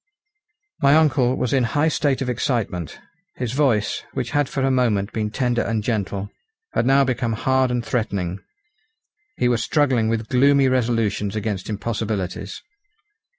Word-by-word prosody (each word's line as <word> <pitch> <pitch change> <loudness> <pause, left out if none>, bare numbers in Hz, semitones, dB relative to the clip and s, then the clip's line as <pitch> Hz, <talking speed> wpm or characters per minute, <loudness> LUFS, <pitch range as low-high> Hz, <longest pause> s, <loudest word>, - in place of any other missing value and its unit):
My 140 +1 +5
uncle 135 -5 +3
was 125 - -1
in 135 -2 +3
high 145 +7 +1
state 140 -3 0
of - - -5
excitement. 115 - -2 0.4
His 125 -3 -3
voice, 130 -7 +1
which 130 -3 -3
had 145 -2 +1
for 135 - -2
a 135 - +2
moment 110 -6 +1
been 110 -1 -1
tender 120 +1 0
and 110 -2 -1
gentle, 100 -2 -2 0.4
had 120 - +1
now 135 +1 +5
become 125 -3 -1
hard 130 +3 +1
and 120 -1 -2
threatening. 100 -6 -2 1.0
He 125 - +2
was 120 -2 +1
struggling 130 -7 +2
with 115 -1 -1
gloomy 140 +2 +4
resolutions 115 -5 0
against 105 -2 -3
impossibilities. 105 -3 -3
120 Hz, 150 wpm, -22 LUFS, 105-130 Hz, 1.0 s, My